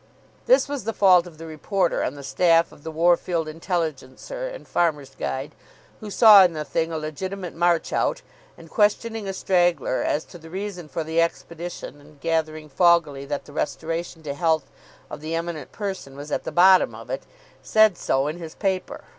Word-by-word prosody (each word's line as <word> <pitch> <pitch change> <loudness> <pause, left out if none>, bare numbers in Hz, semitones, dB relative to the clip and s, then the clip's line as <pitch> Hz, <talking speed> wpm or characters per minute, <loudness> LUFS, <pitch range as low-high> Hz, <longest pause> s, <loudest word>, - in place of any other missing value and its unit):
This - - +5
was 280 -6 -5
the 225 - -2
fault 185 -3 +5
of 165 -3 -13
the 165 - -9
reporter 170 +3 -1
on - - -2
the 140 - -10
staff 165 +3 +3
of - - -16
the 160 - -6
Worfield 170 0 +1
Intelligencer 165 - -4
and - - -9
Farmers' 150 -5 0
Guide, 135 +3 -4 0.5
who 215 - -8
saw 205 -1 +8
in 175 -2 +2
the 155 -1 -4
thing 165 +2 -1
a 160 - -2
legitimate 180 +4 -5
"march 170 -1 +1
out," - - 0 0.3
and, 165 - -13
questioning 210 +3 0
a - - -1
straggler 175 -8 +1
as 155 - -1
to 175 - -13
the 160 0 -13
reason 190 -2 -6
for 165 - -3
the 160 +1 +1
expedition 170 -2 -5
and 145 0 -19
gathering 155 -1 -2
foggily 155 -3 +2
that 145 - -4
the 145 - -14
restoration 165 +2 -3
to 145 -2 -4
health 160 -1 0 0.4
of - - -9
the 160 +2 -3
Eminent 165 -4 -4
Person 190 -10 -6
was 145 +1 -8
at - - -2
the - - -4
bottom 185 +1 +5
of - - -10
it, - - -3 0.4
said 215 -3 +4
so 135 -4 0
in 155 +4 -4
his 160 -2 -8
paper. 190 -2 -2
165 Hz, 190 wpm, -24 LUFS, 155-185 Hz, 0.5 s, saw